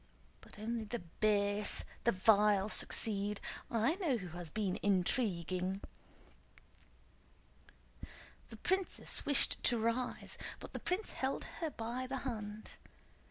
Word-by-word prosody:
But - - -14
only 225 +1 -3
the 240 +3 -3
base, 205 +3 +1 0.2
the 235 - +6
vile 205 0 +4
succeed! 205 -2 +1 0.3
I 235 - +2
know 320 -11 +1
who 185 -5 -6
has 175 0 -6
been 195 0 -1
intriguing!" 185 - +1 2.7
The 225 - -10
princess 375 - 0
wished 285 -1 +5
to 240 - +4
rise, 230 +3 -1 0.2
but - - -10
the - - -4
prince 370 +4 -1
held 265 +1 -2 0.2
her 330 -2 -1
by 245 0 -4
the 270 +1 -2
hand. 215 -4 -5
215 Hz, 115 wpm, -35 LUFS, 200-250 Hz, 2.7 s, the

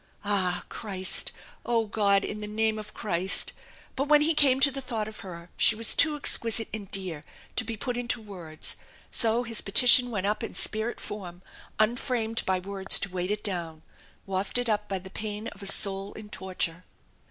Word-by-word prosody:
Ah! 185 -3 +1
Christ! 190 -4 0 0.3
"Oh, 230 -2 0
God, 200 -2 +1
in 210 0 -6
the 210 - -6
name 220 +1 -1
of 215 0 -9
Christ 190 -3 -1 0.2
" - - -25
But 275 +2 -2
when 300 0 +5
he 325 +2 +2
came 275 -4 +4
to 280 - +6
the 270 +1 -6
thought 230 -5 -4
of 215 - -10
her 170 -2 -10
she 225 - +5
was 225 +1 +2
too 310 -2 +4
exquisite 230 -6 +3
and 205 -3 -7
dear 180 -6 -1 0.3
to - - +1
be 225 0 -6
put 245 +3 -4
into 245 0 0
words, 175 -7 -4 0.3
so 230 +1 +3
his 230 -2 -4
petition 245 +4 +6
went 200 -5 -3
up 210 +1 -1
in - - -6
spirit 220 +2 +1
form, 180 -3 -8 0.3
unframed 225 0 0
by 190 0 +1
words 195 +1 +1
to 195 - -3
weight 180 0 -4
it 210 0 -3
down, 170 -6 -5 0.4
wafted 200 +5 -2
up 210 0 -2
by 195 - -2
the 190 +1 -11
pain 210 +1 -5
of 205 - -15
a 200 - 0
soul 195 0 +4
in 215 -1 -11
torture. 180 -3 -4
210 Hz, 190 wpm, -26 LUFS, 190-230 Hz, 0.4 s, to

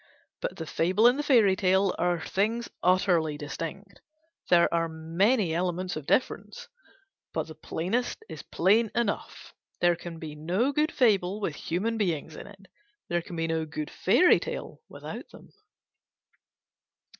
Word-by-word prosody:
But - - -4
the 160 - -5
fable 185 +7 +1
and 245 +4 +5
the - - +2
fairy 230 -10 +4
tale 190 0 +2
are 175 0 +1
things 225 +7 -1
utterly 175 -4 +2
distinct. 165 +6 -7 0.5
There 170 -1 +6
are 165 0 +1
many 170 +5 +1
elements 180 +1 -1
of 155 -2 -7
difference; 255 - -1 0.7
but 160 - 0
the 160 - -10
plainest 190 - -3
is - - -8
plain 210 +6 +2
enough. 235 -4 -3 0.3
There 175 0 +4
can 170 -1 -8
be 160 -2 -7
no 180 - 0
good 300 +3 +1
fable 205 -6 +2
with 195 -7 -2
human 210 +10 -2
beings 160 -5 -1
in - - -9
it. 200 -1 -15 0.4
There 175 0 0
can 175 +1 -9
be 165 0 -1
no 160 0 -1
good 150 0 -5
fairy 355 - +4
tale - - -6
without - - -8
them. - - -16
180 Hz, 150 wpm, -27 LUFS, 165-210 Hz, 0.7 s, There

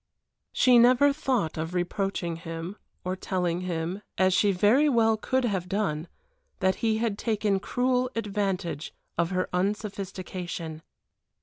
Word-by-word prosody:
She 250 -2 +5
never 255 +4 +6
thought 250 - -1
of 165 +3 -3
reproaching 175 -1 -1
him, 165 +2 -6 0.3
of 185 +1 -2
telling 180 -2 -1
him, 175 +2 -3 0.2
as 185 0 +4
she 205 +2 +4
very 215 +11 +4
well 225 -4 +4
could 260 +4 0
have 190 -5 -1
done, 180 -6 -1 0.5
that 190 0 +2
he 220 -1 +2
had 220 -3 -1
taken 210 -3 +1
cruel 250 +3 +1
advantage 195 -7 -2 0.2
of 170 0 +1
her 185 0 0
unsophistication. 185 -4 -3
195 Hz, 130 wpm, -27 LUFS, 175-225 Hz, 0.5 s, never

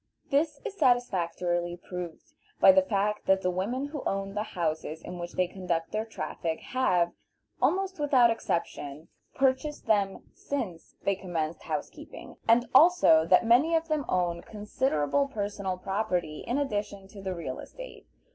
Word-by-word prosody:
This 290 +1 +1
is 390 - -4
satisfactorily 175 - +1
proved 180 - -8 0.3
by - - +9
the 285 0 +5
fact 210 -5 -1
that 190 0 +3
the 180 - +2
women 220 +10 -2
who 295 -2 -5
own 195 0 -2
the 210 - -1 0.2
houses 160 -1 -2
in 180 - -7
which 175 0 -6
they 185 - +2
conduct 175 -3 -3
their 215 +1 -1
traffic 165 -7 -4
have, 180 -10 +1 0.5
almost 380 -1 +1
without 260 -5 +5
exception, 160 -7 -3 0.3
purchased 270 +3 0
them 200 -3 +1
since 220 -13 -5
they 200 - +2
commenced 170 -4 -3
housekeeping, - - -6
and 235 +2 +4
also 265 - +6
that 185 +6 +5
many 265 +9 +4
of 325 0 0
them 305 -2 +1
own 175 -2 0
considerable 210 - 0
personal 200 -5 -3
property 185 -5 -2
in 245 - 0
addition 205 -7 -3
to 200 -1 -11
the 190 -1 -3
real 145 -7 -5
estate. - - -10
200 Hz, 150 wpm, -28 LUFS, 175-260 Hz, 0.5 s, by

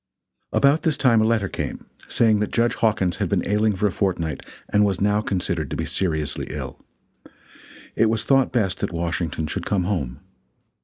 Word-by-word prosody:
About 140 +3 +3
this 155 -4 0
time 120 -5 +4
a - - +3
letter 110 -3 +1
came, - - -5 0.2
saying 110 -3 +3
that 105 - -1
Judge 120 0 +2
Hawkins 95 -6 +1
had - - -1
been - - 0
ailing 105 +1 +2
for 100 +3 -1
a 100 - +2
fortnight, 85 -5 -2 0.2
and 105 - +3
was 100 -3 +1
now 105 +1 +2
considered 85 -7 -2
to - - -4
be - - -2
seriously 80 -6 -1
ill. - - -7 1.1
It 115 - +3
was 110 -1 0
thought 135 -1 +3
best 95 -6 0
that - - -2
Washington 85 -1 -2
should 75 - -4
come 100 -3 +1
home. 75 -10 -2
100 Hz, 185 wpm, -23 LUFS, 85-110 Hz, 1.1 s, time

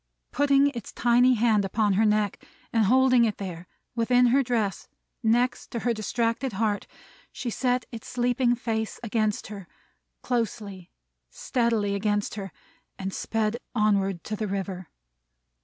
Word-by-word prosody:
Putting 280 0 +4
its 235 -6 -7
tiny 245 +1 +4
hand 220 -2 +3
up 195 - -5
to 215 -2 +2
her 215 +4 +3
neck, 210 -1 +1 0.3
and 225 -2 +3
holding 255 +2 +5
it 215 -3 0
there, 180 -3 -7 0.3
within 245 +2 +3
her 275 - +5
dress, 230 -6 -1 0.3
next 240 +2 +1
to 235 - -4
her 240 - +1
distracted 230 +3 -1
heart, 210 0 -1 0.4
she 240 - -4
set 250 +1 0
its 230 -2 -8
sleeping 245 0 +1
face 220 -2 -3
against 215 -2 0
her: 195 -3 -9 0.6
closely, 210 -6 -3 0.4
steadily 225 - 0
against 205 0 0
her: 195 -3 -6 0.5
and 190 0 -4
sped 225 0 -1 0.2
onward 200 -4 +1
to 215 - -4
the 215 0 -3
river. 190 -2 -4
220 Hz, 140 wpm, -26 LUFS, 205-245 Hz, 0.6 s, holding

